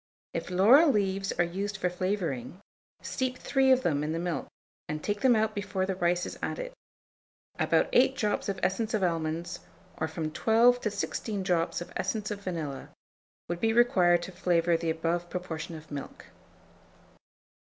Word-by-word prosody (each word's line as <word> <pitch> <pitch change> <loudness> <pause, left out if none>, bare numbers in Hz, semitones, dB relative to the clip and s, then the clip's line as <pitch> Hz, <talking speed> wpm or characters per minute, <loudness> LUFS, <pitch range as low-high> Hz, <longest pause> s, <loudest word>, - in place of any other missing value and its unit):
If 170 +1 -4
laurel 230 - +6
leaves 195 -4 0
are 175 - +2
used 195 +4 -3
for 180 - 0
flavouring, 180 - -2 0.4
steep 255 -1 -2
3 265 0 +2
of 260 0 +4
them 145 -3 +1
in 155 +1 -2
the - - -2
milk, 175 -1 -2 0.4
and 155 0 -4
take 205 0 -2
them 255 -3 +5
out 215 0 +1
before 200 -2 -2
the 190 - -1
rice 175 -1 +1
is - - -7
added: - - -4 0.9
about - - +3
8 - - +5
drops 210 -2 -1
of 195 -1 -2
essence 215 +5 0
of 205 - 0
almonds, 165 +1 -1 0.4
or 160 - 0
from 160 -1 -4
12 235 +7 +4
to 215 - 0
16 205 0 -3
drops 175 -2 0
of 175 - -8
essence 210 +3 -2
of 205 -1 -5
vanilla, 160 -8 -4 0.6
would 175 0 -3
be 225 +2 +2
required 180 -8 +4
to 185 - -7
flavour 175 -2 +2
the 165 0 -1
above 170 +2 -1
proportion 170 -3 -5
of 155 -1 -12
milk. 140 -1 -7
185 Hz, 170 wpm, -29 LUFS, 170-210 Hz, 0.9 s, laurel